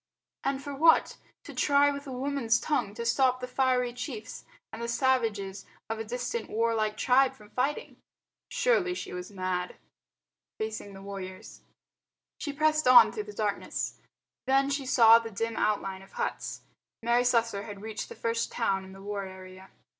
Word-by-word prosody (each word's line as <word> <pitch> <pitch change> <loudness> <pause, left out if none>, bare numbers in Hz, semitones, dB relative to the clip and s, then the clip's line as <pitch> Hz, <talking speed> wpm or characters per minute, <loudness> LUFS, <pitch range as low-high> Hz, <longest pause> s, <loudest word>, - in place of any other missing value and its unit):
And 275 0 -1
for 285 - -5
what? 320 +4 +4 0.3
To - - -10
try 285 0 +4
with 280 0 -6
a - - -6
woman's 255 -3 0
tongue 210 -9 -1
to 235 - -4
stop 255 +1 +3
the 250 - -5
fiery 250 -1 +1
chiefs 235 -3 -7 0.3
and 225 - -6
the 235 - -2
savages 225 -6 0 0.2
of 225 - -3
a - - -2
distant 245 - -4
warlike 220 -1 0
tribe 260 +1 +3
from 210 -1 -17
fighting. 275 +4 -2 0.5
Surely 375 -8 +2
she - - -6
was 180 0 -6
mad. 185 -2 -3 0.8
Facing 220 -2 -5
the 195 - -11
Warriors 190 -2 -8 0.8
She 290 - -3
pressed 310 0 +2
on 255 -1 +9
through 425 -2 -5
the 420 - -8
darkness. - - -3 0.5
Then 275 +1 +3
she 280 -2 -2
saw 230 -4 +7
the 230 -1 -6
dim 225 +2 -3
outlines 195 -3 -1
of - - -23
huts. - - -3 0.4
Mary 240 +1 +3
Slessor 230 -4 +1
had 205 -2 -9
reached 220 0 -5
the - - -9
first 230 0 -1
town 195 -5 0
in 190 0 -12
the 195 0 -12
war 200 -1 -3
area. 185 0 -12
230 Hz, 170 wpm, -29 LUFS, 205-270 Hz, 0.8 s, on